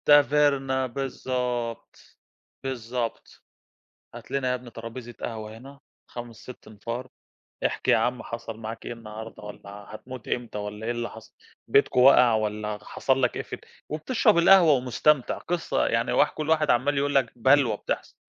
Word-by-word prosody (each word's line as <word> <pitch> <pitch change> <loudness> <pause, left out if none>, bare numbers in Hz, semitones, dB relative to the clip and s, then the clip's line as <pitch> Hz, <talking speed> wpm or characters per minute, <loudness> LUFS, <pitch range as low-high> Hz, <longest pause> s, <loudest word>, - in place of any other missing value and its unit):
ده 145 0 +9
Verna 135 -3 +2
بالضبط، 125 -2 -4 0.5
بالضبط 120 -2 -4 0.7
هات - - -11
لنا 135 -2 0
يا - - +2
ابني 125 -1 -7
ترابيزة 115 +1 -8
قهوة 110 -1 -5
هنا 140 +3 -13 0.3
5 120 -1 -8
6 125 +5 -12
أنفار 115 +4 -6 0.6
احكِ - - -1
يا - - +6
عم 125 +3 0
حصل 115 -1 -6
معاك 115 0 -7
إيه - - -4
النهارده 110 -1 -9
والّا 105 -1 -10 0.2
هتموت 125 +2 -9
امتى 120 -3 -3
والّا 105 +1 -5
إيه 120 - 0
اللي 120 0 -3
حصل؟ 115 - -13 0.3
بيتكم - - +3
وقع 125 -2 +7
والّا 105 -1 -1
حصل 135 +4 0
لك 125 - +1
إيه - - -3
في - - -12
ال - - -18 0.3
وبتشرب 215 - +2
القهوة 170 -1 +7
ومستمتع 130 +2 +2
قصة 175 0 -1
يعني - - +1
واح - - +4
كل 155 0 -5
واحد 155 -2 +3
عمال 140 +4 +2
يقول 140 +1 0
لك 130 -4 +3
بلوى 130 -2 +4
بتحصل - - -4
125 Hz, 160 wpm, -26 LUFS, 115-135 Hz, 0.7 s, ده